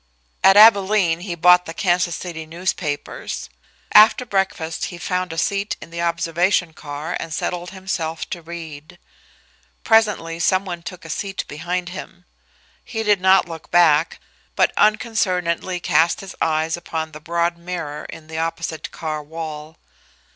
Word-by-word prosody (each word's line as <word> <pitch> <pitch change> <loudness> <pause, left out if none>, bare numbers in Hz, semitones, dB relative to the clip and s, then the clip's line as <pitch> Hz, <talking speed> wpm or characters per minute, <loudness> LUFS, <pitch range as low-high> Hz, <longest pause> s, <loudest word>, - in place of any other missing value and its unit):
At 195 +1 +7
Abilene 200 -5 +6
he 175 -1 -5
bought 180 +1 +5
the 165 - -7
Kansas 175 -2 +1
City 160 -3 -7
newspapers. 165 - -4 0.4
After 215 +4 +7
breakfast 190 -6 -1
he 175 - -7
found 180 0 -2
a 165 - -6
seat 200 +5 -1
in - - -12
the 170 0 -4
observation 170 +1 +1
car 150 +3 -6
and 165 - -6
settled 175 +2 -3
himself 170 -4 -4
to 175 - -4
read. 165 0 -9 0.9
Presently 210 -7 +2
some 185 +3 +2
one 175 -2 -5
took 175 +1 -9
a - - -9
seat 195 +3 -3
behind 175 +4 -3
him. 180 0 -9 0.6
He 220 -2 -4
did 205 -3 +3
not 190 0 +5
look 165 -2 -9
back, 165 -2 +4 0.4
but - - +3
unconcernedly 185 -5 +1
cast 170 -1 +2
his 195 -1 -9
eyes 160 0 +1
upon 160 -2 -5
the 155 0 -11
broad 170 +1 -1
mirror 170 -4 -5
in 160 - -10
the 160 0 -6
opposite 165 -1 -3
car 155 -2 -4
wall. 155 0 -7
170 Hz, 145 wpm, -21 LUFS, 160-185 Hz, 0.9 s, At